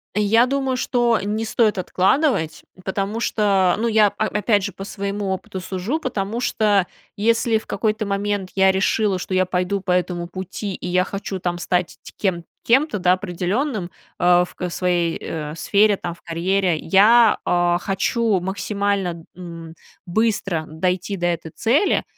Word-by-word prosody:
Я 210 +3 +4
думаю, 270 0 -1
что 240 -2 +1
не 215 +2 -2
стоит 220 -2 +2
откладывать, 185 - +1 0.2
потому 195 +4 -2
что, 195 -5 +2
ну, 235 - 0
я, 215 -2 +5
о 215 +2 -2
опять 210 0 +1
же, 200 -1 -4
по 195 - -8
своему 200 0 -4
опыту 190 0 -5
сужу, 190 - -3
потому 230 -5 -3
что, 205 -6 +2 0.3
если 230 +2 +2
в 220 - -8
какой-то 215 -1 -1
момент 200 -1 -2
я 190 0 +5
решила, 195 0 +1
что 185 - -5
я 185 0 +3
пойду 185 +2 -1
по 185 -1 -3
этому 180 -1 0
пути, 190 +2 -5
и - - -9
я 180 +1 +2
хочу 195 -1 -5
там 175 -1 -2
стать 180 0 -1
ть - - -11
кем, 180 -4 -1 0.2
кем-то, 255 -2 +3
да, 180 0 +4
определенным, 185 - -2 0.3
а, 175 0 +5
в, 180 - -9
э, 180 - -2
своей, 175 -1 0
э, 150 -1 -5
сфере, 205 +4 +3
там 175 -3 -5
в 170 - -19
карьере. 175 +1 0
Я, 210 +7 +5
а, 175 0 +2
хочу 200 +2 0
максимально, 195 -2 -2
м, 165 -2 -9 0.3
быстро 195 -4 0
дойти 180 +5 -2
до 175 -2 -1
этой 170 -2 -3
цели, 290 - +2
195 Hz, 160 wpm, -21 LUFS, 180-215 Hz, 0.3 s, я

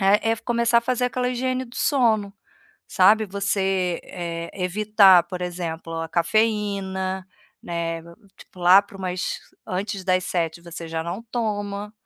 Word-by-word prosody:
é 205 +3 +3
é - - -1
começar 235 0 +2
a - - 0
fazer 250 +1 -1
aquela 250 0 -1
higiene 255 +1 -1
do 240 0 -13
sono, 220 -7 +2 0.5
sabe, 210 +4 +4
você, 195 -2 0
eh, 170 -1 -5
evitar, 195 -1 +5
por 180 +1 -6
exemplo, 170 -2 -5
a 165 - -5
cafeína, 190 -1 0 0.4
né, 170 -1 -3 0.4
tipo, 180 - -15
lá 180 +3 +8
para 200 -1 -14
umas 185 -1 -3 0.3
antes 195 +1 -3
das 185 -1 +2
19:00 170 -1 -2
você 170 -1 -8
já 160 0 -2
não 175 +6 -4
toma, 205 -3 -3
195 Hz, 145 wpm, -23 LUFS, 175-215 Hz, 0.5 s, lá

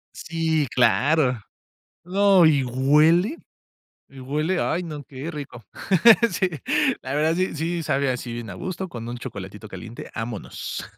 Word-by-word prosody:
Sí, 160 -2 -1
claro. 125 +3 +3 0.7
No, 190 -1 +4
y 145 -3 +4
huele. 150 - +3 0.7
Y 135 -1 -13
huele, 150 +7 -1
ay 175 +3 0
no, 150 -3 -7
qué 135 +5 -7
rico. 135 -6 -8 0.7
Sí, 185 - 0 0.5
la 130 +1 -4
verdad 155 +2 +2
sí, 185 -2 -1
sí 165 +2 -2
sabe 140 -2 0
así 125 -1 -4
bien 115 -2 -6
agusto, 185 - -5
con 120 -6 -7
un 120 - -5
chocolatito 100 0 -8
caliente, 115 +3 -9
vámonos. 115 -2 -5
145 Hz, 135 wpm, -23 LUFS, 125-165 Hz, 0.7 s, No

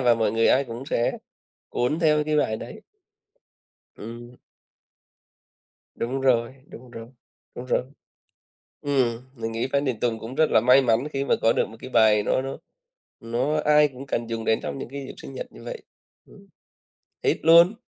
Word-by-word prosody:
và 120 -2 +4
mọi 110 -2 0
người 115 0 +2
ai 135 +2 +4
cũng 120 +1 -7
sẽ 120 -5 0 0.6
cuốn 125 +6 -1
theo 150 -2 +3
cái 155 0 0
bài 110 -7 +1
đấy. - - -9 1.2
Ừm. 120 +2 -10 1.6
Đúng 130 +4 -3
rồi, 125 -2 +2
đúng 125 +1 -13
rồi, 115 -1 -9 0.5
đúng 125 - -7
rồi. - - +1 1.0
Ừm, 130 -5 0
mình 115 -2 -4
nghĩ 115 +3 -2
Phan 140 +1 +2
Đình 125 -5 -2
Tùng 115 -2 -1
cũng 115 +4 -8
rất 155 - +3
là - - +5
may 125 +2 +6
mắn 120 +2 +1
khi 135 0 -1
mà - - +3
có 115 - +4
được - - +1
một 110 - -13
cái - - -9
bài 110 -4 +4
nó 130 - +1
nó 135 +1 -5 0.6
nó 120 +6 -1
ai 150 0 +5
cũng 135 -1 -10
cần 120 -3 -2
dùng 115 -1 -4
đến 110 - +2
trong - - -4
những - - -6
cái 140 +1 -7
dịp - - -8
sinh - - -10
nhật - - -6
như - - -14
vậy. - - -7 0.5
Ừm. 200 0 -18 0.8
Hit 420 - +2
luôn. 170 +4 +7
125 Hz, 185 wpm, -24 LUFS, 115-140 Hz, 1.6 s, luôn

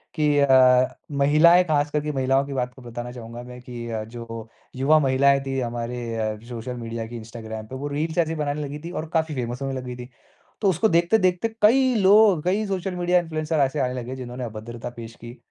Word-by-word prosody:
कि 150 -2 +2
अ, 130 -2 +6 0.2
महिलाएँ 155 +5 +5
ख़ास 150 -4 +1
करके 150 0 -1
महिलाओं 135 0 +1
की 140 - -6
बात 125 -1 -2
को 130 - -15
बताना 120 0 -7
चाहूँगा 120 0 -9
मैं 125 0 -10
कि 120 -1 -7
अ, 110 -1 -3
जो 115 -1 -8 0.3
युवा 145 +4 +4
महिलाएँ 140 0 +3
थीं 135 -1 -2
हमारे 115 -2 -3
सोशल 120 +1 -5
मीडिया 115 -1 -5
की 120 +1 -7
इंस्टाग्राम 110 -1 -8
पे 130 - -8
वो 140 +2 -4
रील्स 155 +3 -3
ऐसी 165 -1 +1
बनाने 150 0 -2
लगी 145 +1 -6
थी 175 - -5
और 160 -3 -5
काफ़ी 160 -2 0
फ़ेमस 125 +1 -4
होने 135 0 -2
लगी 125 -1 -6
थी। 125 +1 -9 0.5
तो 200 - +3
उसको 190 +5 +2
देखते-देखते 180 +3 +2
कई 255 +4 +5
लोग, 195 -4 +5
कई 195 +4 +1
सोशल 190 -1 -3
मीडिया 180 0 +2
इन्फ्लुएंसर 155 -2 -2
ऐसे 140 +2 +1
आने 125 -1 0
लगे 125 +1 -5
जिन्होंने 125 -1 -6
अभद्रता 115 +1 -7
पेश 115 -1 -8
की। 120 +2 -11
135 Hz, 200 wpm, -24 LUFS, 120-160 Hz, 0.5 s, अ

